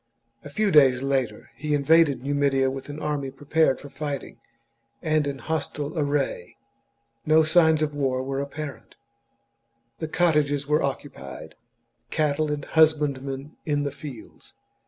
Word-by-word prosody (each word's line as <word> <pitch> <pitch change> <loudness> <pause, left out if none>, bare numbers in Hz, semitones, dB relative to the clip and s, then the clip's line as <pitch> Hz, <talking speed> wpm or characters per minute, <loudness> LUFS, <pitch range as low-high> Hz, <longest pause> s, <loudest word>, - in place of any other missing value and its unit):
A 145 - -9
few 205 +7 0
days 135 -4 +5
later 130 -6 -1
he 150 +1 -1
invaded 145 -3 +4
Numidia 140 -1 +1
with 135 +1 -7
an 145 +1 -6
army 145 -3 -2
prepared 145 +1 +1
for - - -10
fighting, 145 -4 -6 0.6
and 155 -2 +1
in 140 -1 -3
hostile 150 0 -3
array. 145 - -1 0.7
No 155 +3 +5
signs 160 -1 +4
of 150 -1 -1
war 130 -3 0
were 135 +1 -3
apparent; 140 0 -7 1.0
the 160 - -3
cottages 150 -4 +1
were 150 +2 +2
occu 140 0 -3
pied, 70 -1 -10 0.6
cattle 150 0 0
and 145 -1 -3
husbandmen 145 -3 +1
in 145 -2 0
the 140 - -2
fields. 140 -4 -11
145 Hz, 135 wpm, -25 LUFS, 135-155 Hz, 1.0 s, days